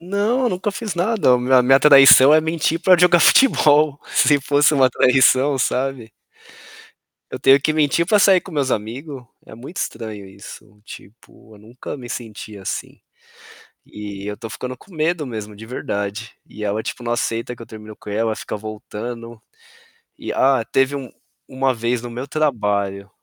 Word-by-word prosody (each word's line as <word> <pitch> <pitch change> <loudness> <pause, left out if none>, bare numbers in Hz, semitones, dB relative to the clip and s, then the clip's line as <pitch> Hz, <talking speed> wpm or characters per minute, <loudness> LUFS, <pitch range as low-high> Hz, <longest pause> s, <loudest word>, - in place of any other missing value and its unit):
Não, 200 +8 -1
eu 245 - +2
nunca 190 +2 -3
fiz 210 -3 -5
nada, 175 - +2
me 125 +2 -3
a 130 -1 +6
minha 135 +2 +4
traição 140 0 +7
é 155 - +5
mentir 160 +1 -2
pra 185 0 +5
jogar 175 0 +4
futebol, 150 - +4
se 145 -2 +3
fosse 145 +2 +2
uma 130 -2 +3
traição, 130 +2 +3
sabe? 130 -2 -2 1.2
Eu - - -6
tenho 135 +1 +4
que 155 - 0
mentir 155 +2 +1
pra 210 +3 +3
sair 190 -2 +4
com 185 - -13
meus 140 -4 -1
amigo. 125 +5 -5 0.2
É - - -12
muito 130 - -10
estranho 110 -3 -6
isso, 95 +2 -14
tipo, 110 +1 -16
eu - - -17
nunca 115 +7 -10
me 125 -3 -11
senti 110 -3 -8
assim. 95 -2 -7 0.9
E 100 -1 -9
eu 105 0 -5
tô 115 0 -9
ficando 125 +3 -7
com 190 - -20
medo 160 0 -1
mesmo 110 -3 -7
de 110 - -11
verdade. 110 -3 -5
E 105 - -9
ela, 105 +2 -2
tipo, 125 - -7
não 120 0 -3
aceita 115 0 -3
que 115 - -12
eu - - -11
terminei 110 0 -12
com - - -10
ela, 110 +2 -1
ela 110 - -4
fica - - -6
voltando. 110 +2 -8 0.8
E - - -6
ah, 130 -3 +2
teve 135 +1 +1
um 130 -4 -8 0.4
uma 130 0 -1
vez 120 0 -3
no 120 - -7
meu 125 +3 -6
trabalho, 105 -10 -2
130 Hz, 180 wpm, -19 LUFS, 110-150 Hz, 1.2 s, traição